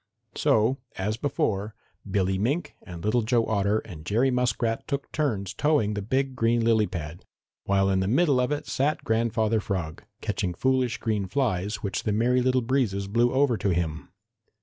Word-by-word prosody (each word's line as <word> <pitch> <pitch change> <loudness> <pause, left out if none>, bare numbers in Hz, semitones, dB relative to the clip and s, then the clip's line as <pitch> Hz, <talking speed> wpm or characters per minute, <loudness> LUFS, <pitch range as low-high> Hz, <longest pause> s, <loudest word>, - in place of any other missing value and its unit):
So, 110 +5 +2 0.2
as 105 +3 -1
before, 110 -5 -1 0.3
Billy 95 -1 +1
Mink 145 - -1
and 85 0 -9
Little 115 +3 +2
Joe 115 +1 +2
Otter 100 -1 +1
and 75 -3 -10
Jerry 115 +9 +2
Muskrat 120 -2 0
took 140 0 -3
turns 105 -11 -1
towing 145 -9 +1
the 105 - -3
big 130 +5 -1
green 115 -1 +2
lily 110 -2 +3
pad, 85 -1 -6 0.4
while 95 0 +2
in 95 -1 +2
the 95 - 0
middle 140 - +3
of 125 +2 +1
it 150 - -2
sat 145 +4 0
Grandfather 110 -1 +1
Frog, 90 -7 -4 0.2
catching 90 -2 -2
foolish 130 +1 +1
green 105 -4 -1
flies 105 -3 -1
which 100 - -2
the 105 - -1
Merry 125 +4 +2
Little 130 0 +2
Breezes 115 -6 0
blew 120 +4 +2
over 130 -3 +2
to 100 - -1
him. 85 -3 -2
110 Hz, 170 wpm, -26 LUFS, 100-125 Hz, 0.4 s, lily